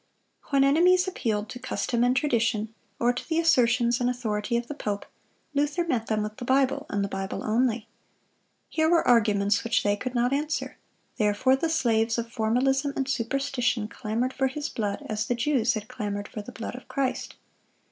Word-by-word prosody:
When 275 -1 +4
enemies 360 +6 +4
appealed 215 - -1
to 250 - -7
custom 240 -1 -1
and 250 +1 +3
tradition, 225 -6 +1 0.3
or 240 +1 +3
to 245 - -7
the 320 - +1
assertions 245 -6 +3
and 245 - +2
authority 235 -2 -1
of 235 - -2
the 295 - -6
pope, 205 -8 -3 0.5
Luther 295 +4 +1
met 245 -9 -1
them 215 -1 0
with 210 0 -6
the 255 - -6
Bible, 260 +1 +1
and 200 0 0
the - - -1
Bible 195 -1 -4
only. 230 0 +1 0.8
Here 315 0 +1
were 340 -1 +3
arguments 210 -4 +3
which 230 - +1
they 205 0 +2
could 250 +4 -5
not 245 +2 +2
answer; 300 +2 -2 0.4
therefore 215 +4 +3
the 325 +5 -1
slaves 230 -7 +2
of 230 0 -3
formalism 265 +5 +1
and 270 - -1
superstition 245 -3 0
clamored 230 +5 -2
for 265 - +1
his 295 +3 -4
blood, 205 -3 -3
as 215 0 -2
the 245 - +1
Jews 240 -1 +1
had 215 0 -5
clamored 205 -3 -4
for 210 - -7
the 205 - -10
blood 230 - -6
of 250 - -10
Christ. 265 -2 -2
245 Hz, 185 wpm, -26 LUFS, 220-270 Hz, 0.8 s, When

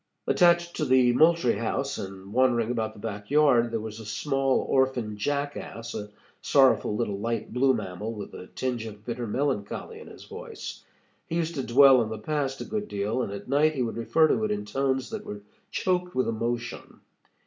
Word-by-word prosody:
Attached 175 -1 +3
to 155 - 0
the 130 -2 +4
Moultrie 155 -6 +4
House, 135 +4 -2
and 95 +1 -8
wandering 120 -2 +3
about 110 -3 -2
the - - -12
back 105 -1 -6
yard, 140 -5 +4
there 115 -1 -2
was 110 0 -7
a - - -8
small 135 +4 +1
orphan 130 -5 0
jackass, 140 -1 -3
a 105 0 -5 0.3
sorrowful 135 -6 +4
little 105 -3 -2
light 115 +2 -3
blue 130 +1 +3
mammal, 105 0 -4
with 105 -3 -8
a 90 - -9
tinge 125 -3 -2
of 105 0 -11
bitter 120 0 -4
melancholy 125 -3 -2
in - - -12
his - - -12
voice. - - -8 0.4
He 165 - -3
used 170 0 -1
to 135 -4 -3
dwell 130 +1 +7
on 110 - -2
the 110 - -4
past 135 +3 -2
a - - -4
good 210 -1 -3
deal, 105 +5 -1
and 110 - -3
at 100 0 -7
night 150 +4 +3
he 130 - 0
would 115 - -3
refer 155 +7 +3
to 115 -7 +1
it - - 0
in 105 0 -2
tones 135 - -1
that 220 -2 -5
were 105 0 -7 0.3
choked 180 -1 -1
with 130 - +1
emotion. 115 +1 -4
120 Hz, 195 wpm, -27 LUFS, 110-140 Hz, 0.4 s, dwell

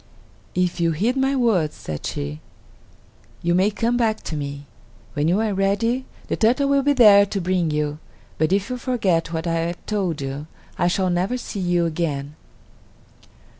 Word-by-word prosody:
"If 180 -1 0
you 165 -1 +2
heed 220 +11 0
my 270 +1 +1
words," 210 - +2
said 75 -2 -6
she, 70 +1 -4 1.0
"you 170 0 +2
may 185 +3 +3
come 230 +3 0
back 225 -3 0
to 155 - -4
me. 145 -1 -5 0.5
When 145 +3 0
you 180 +5 +2
are 220 -2 0
ready, 205 +6 +1 0.2
the - - -1
turtle 255 +5 +2
will 280 0 +4
be 285 +1 +3
there 210 -6 +8
to 200 0 -2
bring 180 -2 0
you; 150 0 -1 0.4
but 155 +2 +2
if 200 +4 +1
you 250 - -2
forget 195 -10 0
what 160 0 -3
I 170 - 0
have 170 +1 -4
told 190 -7 -1
you, 140 +2 -5 0.3
I 175 - +1
shall 185 +1 +1
never 185 +8 0
see 225 -4 -6
you 175 -2 +1
again." 150 -4 -2
180 Hz, 175 wpm, -22 LUFS, 160-220 Hz, 1.0 s, there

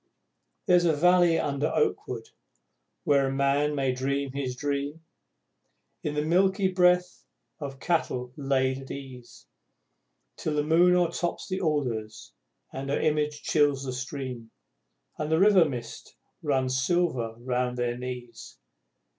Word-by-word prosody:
There's 180 -3 +4
a 160 -3 +3
valley, 175 +1 +4
under 145 +1 0
oakwood, 450 - -1 0.8
where 140 -4 +3
a - - -1
man 140 +2 +1
may 135 -2 +1
dream 140 +2 -2
his 130 -2 -3
dream, 145 +3 -3 1.0
In 150 -1 -3
the 150 - 0
milky 190 +3 +2
breath 180 -1 +2 0.4
of 140 -3 -6
cattle 125 -7 -1
laid 135 -2 0
at 135 - -11
ease, 125 -4 -10 0.9
Till 155 - -2
the 150 - +1
moon 170 +4 +4
o'ertops 175 0 -1
the 185 0 -3
alders, 115 - -2 0.4
and 135 +1 -5
her 140 - 0
image 150 -1 0
chills 145 -3 +2
the 130 -2 -4
stream, 130 -3 -6 0.7
And 155 0 -2
the 160 - +4
river 195 -3 +6
mist 120 -6 -7 0.3
runs 130 -3 0
silver 135 -9 0
round 125 0 -2
their 120 -1 -1
knees! 125 -1 -8
140 Hz, 130 wpm, -27 LUFS, 130-165 Hz, 1.0 s, river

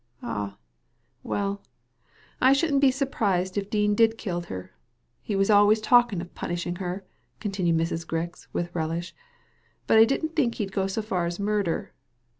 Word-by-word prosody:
*' - - -25
Ah, 100 -1 -4 0.6
well, 200 0 -2 0.8
I 260 +1 +6
shouldn't 280 -1 +2
be 275 - +6
surprised 205 -9 0
if 200 -1 -2
Dean 210 -1 +2
did 225 +1 +3
kill 175 -6 -3
her. 95 - -8 0.5
He 210 - -3
was 195 +2 +3
always 205 +1 +6
talking 235 -4 +4
of 175 - -10
punishing 175 0 -3
her," 185 +1 -4 0.3
continued 190 -6 0
Mrs. 165 0 -1
Grix, 165 +1 -4
with 175 0 -3
relish; 165 +1 -3 0.7
"but 220 - +5
I 225 - +9
didn't 315 +6 -2
think 245 -7 +1
he'd 200 -3 -3
go 190 0 0
so 205 +3 -2
far 180 -5 -1
as 175 +2 -4
murder." 200 -4 -1
200 Hz, 165 wpm, -26 LUFS, 175-220 Hz, 0.8 s, I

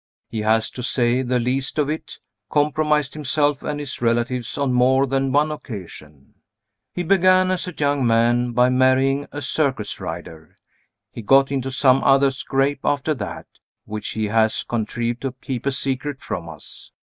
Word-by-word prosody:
He 110 - -4
has, 110 +1 +1
to 125 - -7
say 125 0 +1
the 125 -1 0
least 130 +4 -2
of 150 -2 +2
it, 155 +2 -5 0.3
compromised 150 -1 +1
himself 145 -1 0
and 150 -1 -3
his 145 -4 -6
relatives 120 +1 0
on 140 -3 0
more 130 +2 +4
than 135 0 0
one 150 +3 +2
occasion. 85 - -9 0.6
He 180 - -3
began 185 +1 +4
as 185 0 -2
a 180 - -5
young 145 -3 +1
man 120 +2 +2
by 125 +1 +4
marrying 130 +2 +2
a 145 0 -6
circus 135 -6 -1
rider. 80 -1 -8 0.6
He 115 - -7
got 135 +5 +4
into 135 -1 -1
some 130 0 +3
other 135 0 +4
scrape, 135 +1 -1
after 145 +2 +1
that, 135 - -6 0.4
which 105 0 -5
he 110 -1 -1
has 110 +1 +1
contrived 120 +1 -3
to 135 -2 -3
keep 130 0 -5
a - - +3
secret 135 +1 -3
from 85 -9 -5
us. 80 -2 -10
130 Hz, 165 wpm, -22 LUFS, 120-145 Hz, 0.6 s, more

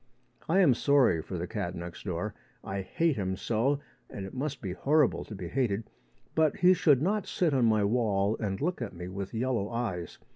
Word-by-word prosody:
I 190 +4 +5
am 150 -9 +6
sorry 130 - +3
for 90 - -6
the 85 - -3
cat 95 -4 -4
next 85 +1 -8
door. 95 +3 -3 0.3
I 95 0 -3
hate 160 - 0
him 95 -2 -2
so, 120 +8 +1 0.3
and 95 - -6
it 95 - -9
must 140 +1 -3
be 95 -4 -4
horrible 150 +8 +2
to 105 - -8
be 90 -3 -6
hated. 110 0 -1 0.4
But 160 +2 +3
he 180 -1 +6
should 145 -6 +4
not 205 +2 0
sit 170 -5 +1
on 130 -3 +3
my 110 -2 +3
wall 105 -2 +1
and 95 -3 -2
look 175 -1 -1
at 120 - -4
me 90 +1 -6
with 95 +1 -5
yellow 115 -3 0
eyes. 110 -9 -3
110 Hz, 205 wpm, -29 LUFS, 95-140 Hz, 0.4 s, am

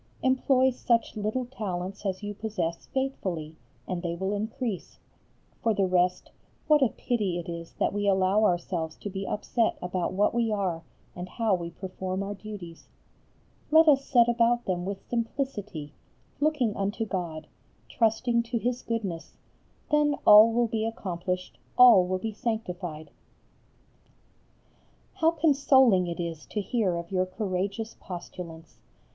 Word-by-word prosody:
Employ 260 0 +3
such 235 -2 0
little 215 +4 -2
talents 200 -5 -5
as 190 +2 -3
you 205 0 -4
possess 195 -6 -3
faithfully, 185 - -3 0.3
and 180 -2 -3
they 170 -1 -3
will 190 +3 -2
increase. 220 -1 -4 0.6
For 225 -2 +2
the 195 - +2
rest 180 0 +1 0.3
what 300 -2 +4
a 260 - +4
pity 210 -9 -1
it 175 - -6
is 170 -1 -7
that - - 0
we 205 0 -1
allow 190 +2 +3
ourselves 175 -4 0
to 205 - -6
be 195 0 -4
upset 225 +2 0
about 180 0 -2
what 205 +2 +2
we 230 -2 +1
are 190 -6 -1 0.3
and 180 +1 -6
how 225 +1 0
we 170 -2 -1
perform 185 +1 -4
our 200 +1 -4
duties. 195 -5 -9 0.8
Let 320 +1 +6
us 275 -2 +5
set 240 -4 +4
about 240 0 +2
them 180 -1 -1
with 195 0 -6
simplicity, 220 - -3 0.5
looking 290 -8 +1
unto 205 +3 -2
God, 170 -6 -4 0.4
trusting 235 +1 +1
to 235 +1 -3
His 245 +2 -1
goodness, 190 -8 -4 0.5
then 295 -1 +3
all 210 +2 +9
will 240 +1 +2
be 225 -1 -2
accomplished, 185 -4 -4 0.2
all 235 -8 +8
will 185 0 0
be 220 +3 -4
sanctified. 180 -9 -4 2.1
How 320 - +4
consoling 270 - +4
it 170 0 -5
is 165 -2 -5
to 210 - -3
hear 205 -3 0
of 170 +1 -6
your 185 -1 +1
courageous 195 +3 -3
postulants! 175 -2 -9
205 Hz, 145 wpm, -27 LUFS, 180-235 Hz, 2.1 s, all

